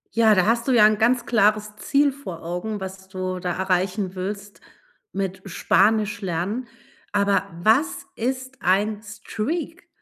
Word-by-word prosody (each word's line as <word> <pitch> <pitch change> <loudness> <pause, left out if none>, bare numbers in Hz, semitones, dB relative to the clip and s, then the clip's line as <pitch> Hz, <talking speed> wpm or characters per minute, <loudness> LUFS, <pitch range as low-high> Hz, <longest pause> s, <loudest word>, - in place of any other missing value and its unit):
Ja, 220 -2 +5
da 185 +1 +3
hast 230 +2 +1
du - - +3
ja 225 -4 +7
'n 215 -1 +1
ganz 235 +2 +2
klares 210 -1 +2
Ziel 285 +5 +2
vor 185 -13 -9
Augen, 180 +5 -4
was 190 0 -8
du 185 -1 -4
da 180 0 -2
erreichen 190 +1 -1
willst 200 +2 -5 0.5
mit 190 -1 -3
Spanischlernen. 205 +2 +1 0.4
Aber 200 -1 +2 0.2
was 245 - +2
ist 260 +2 -3
ein 205 +3 +1
Streak? 235 +10 -5
210 Hz, 140 wpm, -23 LUFS, 190-230 Hz, 0.5 s, ja